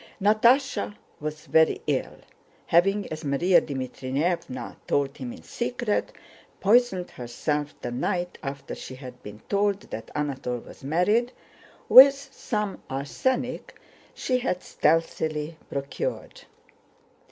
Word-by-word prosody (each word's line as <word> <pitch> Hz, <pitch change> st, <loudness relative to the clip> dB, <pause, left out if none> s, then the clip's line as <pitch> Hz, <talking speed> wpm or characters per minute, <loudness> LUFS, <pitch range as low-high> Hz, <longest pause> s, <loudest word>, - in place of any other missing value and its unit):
Natásha 225 Hz, +3 st, +3 dB, 0.2 s
was 155 Hz, 0 st, -5 dB
very 160 Hz, 0 st, +4 dB
ill, -, -, -1 dB, 0.5 s
having, 195 Hz, +4 st, +3 dB
as 155 Hz, +1 st, -5 dB
Márya 155 Hz, +6 st, +4 dB
Dmítrievna 135 Hz, +2 st, -3 dB
told 140 Hz, 0 st, +1 dB
him 125 Hz, -3 st, -5 dB
in -, -, -11 dB
secret, 240 Hz, -3 st, -2 dB, 0.5 s
poisoned 205 Hz, -3 st, +3 dB
herself 145 Hz, +5 st, -3 dB
the 120 Hz, -, -3 dB
night 175 Hz, +8 st, -2 dB
after 140 Hz, -1 st, -6 dB
she 130 Hz, -, -8 dB
had 125 Hz, -2 st, -11 dB
been 105 Hz, +1 st, -10 dB
told 200 Hz, 0 st, +1 dB
that 115 Hz, -, -6 dB
Anatole 135 Hz, -4 st, -2 dB
was -, -, -14 dB
married, 205 Hz, -, +2 dB, 0.5 s
with 275 Hz, +2 st, +10 dB
some 240 Hz, -7 st, -4 dB
arsenic 245 Hz, -, -2 dB, 0.4 s
she 255 Hz, -1 st, 0 dB
had 185 Hz, -8 st, -2 dB
stealthily 160 Hz, -1 st, 0 dB
procured. 140 Hz, -, -4 dB
165 Hz, 110 wpm, -26 LUFS, 140-210 Hz, 0.5 s, with